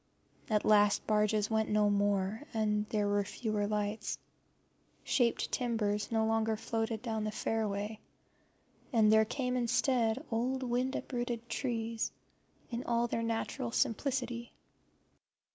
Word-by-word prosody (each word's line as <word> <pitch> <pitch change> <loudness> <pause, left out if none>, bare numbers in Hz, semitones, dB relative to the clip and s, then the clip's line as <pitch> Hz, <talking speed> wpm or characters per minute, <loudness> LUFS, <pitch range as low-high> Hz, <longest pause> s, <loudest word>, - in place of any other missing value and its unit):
At 210 -1 +2
last 210 -1 +5
the - - -31
barges 210 0 +2
went 220 0 +1
no 210 0 +3
more, 205 +1 +1
and 210 -1 +1
there 210 -2 +1
were 205 0 +2
fewer 210 0 -2
lights; 210 +1 -2 0.9
shaped 240 -3 +1
timbers 215 -4 0
no 220 -1 +2
longer 225 0 +1
floated 225 0 -2
down 220 -3 -2
the 215 - -1
fairway, 215 -1 -2 0.9
and 220 -4 +5
there 220 0 +6
came 250 +2 -2
instead 245 -1 +1
old 255 +4 0
wind 255 +2 0
uprooted 240 -2 -3
trees 230 -4 -2 0.6
in 235 +1 -3
all 235 0 +2
their 230 -1 -1
natural 230 +2 -2
simplicity. 240 0 -1
225 Hz, 125 wpm, -33 LUFS, 210-240 Hz, 0.9 s, there